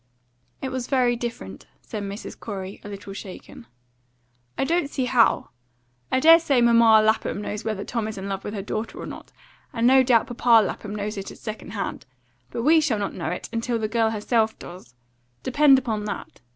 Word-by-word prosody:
"It 265 - -2
was 260 -2 -4
very 250 -3 +2
different," 230 - -7 0.2
said 215 - -6
Mrs. 200 +2 -6
Corey, 195 -2 -7
a 205 - -8
little 200 -1 -8
shaken. 190 - -10 0.9
"I - - +1
don't 325 0 0
see 265 -3 -2
how. 245 -2 +2 0.6
I - - +3
dare 325 +4 +8
say 280 -6 +2
Mamma 230 -2 +6
Lapham 220 -2 +1
knows 210 +1 -5
whether 215 -3 -3
Tom 230 -3 -2
is 220 - -6
in 190 +1 -5
love 195 0 -4
with 205 - -5
her 195 - -4
daughter 215 +3 -4
or - - -6
not; - - -10 0.4
and 230 0 -1
no 265 +2 +7
doubt 245 -3 +3
Papa 235 -3 +4
Lapham 210 +1 -5
knows 210 +1 -4
it 195 - -5
at - - -11
second 215 0 -7
hand. 200 -8 -4 0.4
But 230 - -4
we 315 +3 +5
shall 265 -8 +1
not 200 -1 -3
know - - -4
it - - -4
until 230 +1 -1
the 220 -1 -1
girl 225 0 +1
herself 220 +1 0
does. 150 -9 -12 0.5
Depend 275 +1 +5
upon 220 -5 -2
that. 205 - -7
225 Hz, 195 wpm, -24 LUFS, 205-250 Hz, 0.9 s, dare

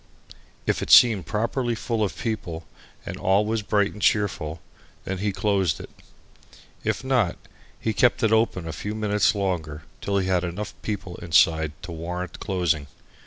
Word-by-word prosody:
If - - 0
it - - -4
seemed 110 -7 +7
properly 115 +2 -1
full 115 0 -1
of 100 - -2
people 100 -8 -4 0.4
and - - -5
all 100 +3 +2
was 110 +1 0
bright 105 0 +1
and 105 - -10
cheerful, 90 -7 +1 0.5
then 95 -1 -3
he 100 +1 0
closed 95 -6 +1
it. - - -10 0.9
If - - -1
not, 125 -9 +1 0.4
he 110 - -1
kept 120 +2 +3
it 110 - +3
open 110 -6 +2
a 80 - -4
few 105 +4 -4
minutes 105 0 +2
longer 85 -6 -2 0.2
till 100 0 0
he 95 -1 0
had 90 -1 +2
enough 90 +4 -4
people 100 -4 -4
inside 80 -2 +3
to 90 - -7
warrant 90 +2 -5
closing. 85 -7 0
100 Hz, 165 wpm, -25 LUFS, 85-110 Hz, 0.9 s, seemed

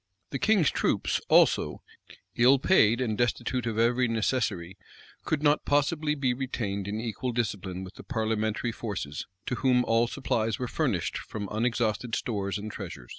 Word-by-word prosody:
The 135 - -2
king's 205 -9 +3
troops, - - 0
also, - - +4 0.5
ill 125 +3 +6
paid, 120 - +4
and 110 -4 0
destitute 120 +1 -1
of 110 -2 -2
every 120 +2 +3
necessary, 110 -6 -1 0.5
could 155 -1 -1
not 145 0 +3
possibly 150 +1 +1
be 135 -4 +1
retained 110 -7 -3
in 105 +2 -3
equal 115 +2 -3
discipline 95 -6 -3
with 95 +1 -9
the - - -12
parliamentary 110 -1 -1
forces, 100 -11 -5 0.2
to - - -2
whom 125 -2 +3
all 115 +1 +3
supplies 115 -4 -1
were 125 - -3
furnished - - -1
from 105 -2 -6
unexhausted 115 0 0
stores 100 -4 -2
and 105 +1 -6
treasures. 85 - -8
115 Hz, 155 wpm, -28 LUFS, 105-130 Hz, 0.5 s, ill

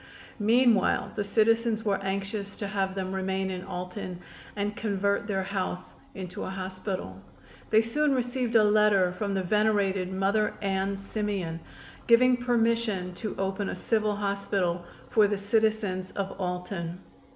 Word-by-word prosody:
Meanwhile 230 0 +3
the 205 - 0
citizens 225 +2 +2
were 200 -2 +1
anxious 195 +1 -3
to 205 - -3
have 195 -1 -1
them 190 -1 -3
remain 190 0 -1
in 180 -1 -4
Alton 180 0 -5 0.4
and 205 0 -2
convert 200 -1 0
their 195 -2 0
house 185 -2 -3 0.2
into 185 -2 -6
a - - -4
hospital. 185 - -5 0.5
They 220 0 +6
soon 280 +5 +1
received 245 -1 -1
a 220 - +7
letter 210 -3 +4
from 200 +2 -2
the 190 - 0
venerated 200 -2 +1
Mother 195 +3 +1
Ann 195 0 -1
Simeon, 195 -4 -3 0.5
giving 250 +2 +6
permission 230 -6 +1
to 210 +3 -5
open 195 +1 -1
a - - -3
civil 215 -2 0
hospital 200 -3 -1 0.3
for 215 -2 +5
the 205 0 -1
citizens 205 -2 0
of 195 -1 -3
Alton. 180 -1 -3
200 Hz, 140 wpm, -28 LUFS, 190-215 Hz, 0.5 s, a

